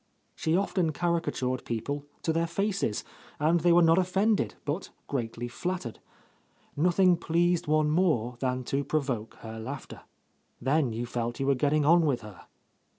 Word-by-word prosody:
She 160 +2 +1
often 185 -4 0
caricatured 155 -7 -1
people 140 +5 -3 0.2
to 160 - +1
their 165 +1 +1
faces, 195 - -1 0.4
and 160 +3 +3
they 175 +2 +3
were 175 0 +6
not 165 +2 +5
offended, 195 +3 +1
but 150 +7 -3 0.2
greatly 120 -2 -3
flattered. 155 -1 -4 0.8
Nothing 180 +3 +4
pleased 170 +1 +1
one 155 0 +3
more 150 -9 +1
than 130 0 -1
to 140 +3 -1
provoke 135 -7 -2
her 110 0 -7
laughter. 135 +5 -7 0.6
Then 135 0 +1
you 115 +2 -3
felt 120 0 -3
you 135 - 0
were 140 - +4
getting 145 +3 +2
on 165 +1 +5
with 130 -5 0
her. 105 -5 -12
150 Hz, 155 wpm, -28 LUFS, 125-175 Hz, 0.8 s, were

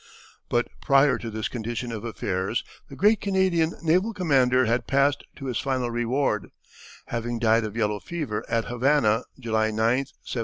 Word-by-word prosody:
But - - +1
prior 135 -1 +4
to 115 - -5
this 110 0 -3
condition 120 +1 -4
of 110 -2 -5
affairs 100 -2 -2 0.3
the 135 - -9
great 210 +6 +3
Canadian 190 -4 +1
naval 185 +7 +2
commander 130 -8 +3
had 120 +2 0
passed 140 +1 +2
to 135 - -8
his 125 -3 -2
final 130 -3 -1
reward, 120 -2 0 0.6
having 120 0 -2
died 115 0 +3
of 110 +1 -6
yellow 105 -2 0
fever 150 -10 -4
at 115 0 0
Havana, 120 -2 +2 0.2
July 110 -3 +1
9, 110 - -5
1706. 120 +5 +2
120 Hz, 160 wpm, -25 LUFS, 115-140 Hz, 0.6 s, prior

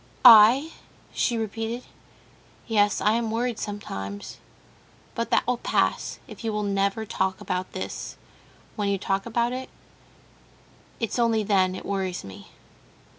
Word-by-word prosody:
"I?" 240 +7 +9 0.4
she 235 - 0
repeated. 225 +2 -3 0.8
"Yes, 205 -3 +2
I 210 - +3
am 230 0 0
worried 230 +1 -1
sometimes; 100 - -6 0.7
but 230 - -3
that - - +2
will 250 0 0
pass, - - 0
if - - -11
you 225 - -1
will 210 0 -2
never 200 +2 0
talk 190 -2 -1
about 185 0 -3
this. - - -6 0.6
When 205 -2 -1
you 200 - +1
talk 195 +2 -2
about 235 +1 0
it—it's 255 -2 -10
only 230 -2 +2
then 190 -2 +2
it - - -8
worries 190 -2 -2
me." 95 -1 -11
215 Hz, 130 wpm, -25 LUFS, 195-230 Hz, 0.8 s, I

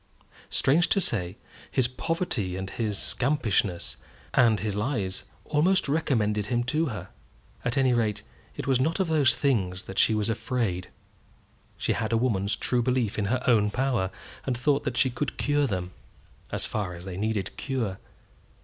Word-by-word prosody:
Strange 165 +6 +3
to - - +3
say, 95 - 0 0.3
his 130 -2 +2
poverty 125 - -2
and 95 0 -5
his 105 -3 -1
scampishness 110 - +1 0.4
and 115 -5 +4
his 105 -1 -2
lies 105 -4 -2 0.2
almost 170 +5 +2
recommended 110 -9 +1
him 120 -1 +1
to 155 +6 0
her. 110 -6 -6 0.5
At 125 - 0
any 130 -2 +4
rate, 110 -3 0 0.3
it - - -5
was 135 -2 +2
not 160 +8 +1
of 190 -3 +1
those 150 -5 +4
things 95 -10 0
that 95 - -4
she 110 - +5
was 105 0 +1
afraid. 115 -6 -1 0.9
She - - 0
had 110 0 -2
a 115 - +3
woman's 110 -4 +1
true 125 -1 +1
belief 120 -4 0
in 100 - 0
her 125 +5 0
own 110 -4 +4
power, 120 -5 0 0.3
and 130 -3 -1
thought 140 +3 +1
that 130 -3 -2
she 130 - +3
could 125 +3 -3
cure 145 0 +2
them, 90 -4 -3 0.6
as - - -1
far 100 -5 -3
as 85 +2 -10
they 95 -2 -5
needed 105 -1 -2
cure. 115 -9 -2
120 Hz, 165 wpm, -27 LUFS, 100-135 Hz, 0.9 s, she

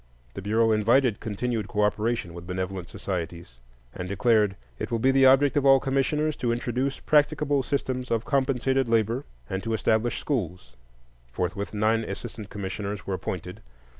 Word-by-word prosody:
The 100 - -6
Bureau 110 +3 +2
invited 115 +2 +3
continued 110 0 -2
cooperation 105 -2 0
with 85 0 -9
benevolent 95 0 -4
societies, 85 -8 -5 0.3
and 90 0 -6
declared: 105 -1 +3 0.2
"It - - -3
will 115 - 0
be 130 +4 +3
the 135 0 +6
object 135 +3 +5
of 145 - +3
all 135 -1 +7
commissioners 145 +3 0
to 120 -2 0
introduce 125 +3 -1
practicable 145 -1 +2
systems 130 -2 -2
of 115 -1 0
compensated 135 -2 +1
labor," 115 +4 +1 0.2
and 95 0 -3
to 115 +1 -1
establish 110 +2 +1
schools. 90 - -3 0.6
Forthwith 95 - -3
nine 110 +2 +2
assistant 110 -2 -7
commissioners 100 0 -5
were 100 - -2
appointed. 95 - -5
115 Hz, 150 wpm, -26 LUFS, 100-130 Hz, 0.6 s, all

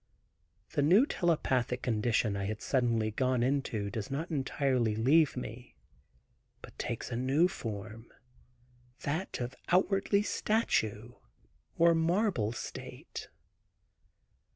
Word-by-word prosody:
The 145 - +1
new 185 - +6
telepathic 130 - 0
condition 110 -2 +1
I 100 -1 -2
had 105 +1 -3
suddenly 115 -4 +1
gone 125 +1 +1
into 120 -6 -1
does 105 -1 -4
not 150 +5 -3
entirely 130 -5 0
leave 140 +6 +3
me. 120 0 -7 0.9
But - - -12
takes - - -4
a - - -2
new 135 +8 +3
form, 110 - -7 0.9
that 160 +7 -3
of 125 +1 -3
outwardly 195 +2 +2
statue 120 - 0 0.6
or 170 0 +6
marble 165 - +1
state. 120 - -8
130 Hz, 105 wpm, -31 LUFS, 110-165 Hz, 0.9 s, new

